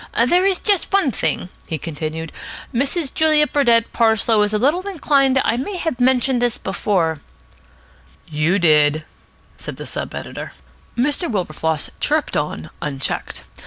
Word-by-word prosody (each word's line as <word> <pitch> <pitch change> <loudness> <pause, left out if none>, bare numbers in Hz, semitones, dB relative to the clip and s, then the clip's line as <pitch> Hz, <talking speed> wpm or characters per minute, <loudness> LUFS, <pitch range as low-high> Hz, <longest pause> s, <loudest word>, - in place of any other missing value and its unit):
"There 360 +6 +3
is 385 -2 +2
just 405 -4 0
one 390 -9 +3
thing," 185 - -2 0.2
he 160 - -3
continued 160 0 -5 0.4
"Mrs. 275 +4 -1
Julia 310 -1 +4
Burdett 235 -6 +2
Parslow 220 -1 +3
is 210 0 +1
a 215 - +1
little 305 - +1
inclined 280 -7 +2
I 230 - +1
may 365 +10 -4
have 320 -7 -3
mentioned 255 0 +2
this 245 -1 +1
before 180 -5 -1 0.6
" 65 +4 -30
"You 170 +6 +3
did," 155 -3 +3 0.5
said - - -6
the - - -8
sub - - -5
editor. - - -7 0.4
Mr. 290 +8 0
Wilberfloss 160 -5 -1
chirruped - - 0
on, 80 0 -3
unchecked. 140 -2 -3
235 Hz, 145 wpm, -20 LUFS, -, 0.6 s, Julia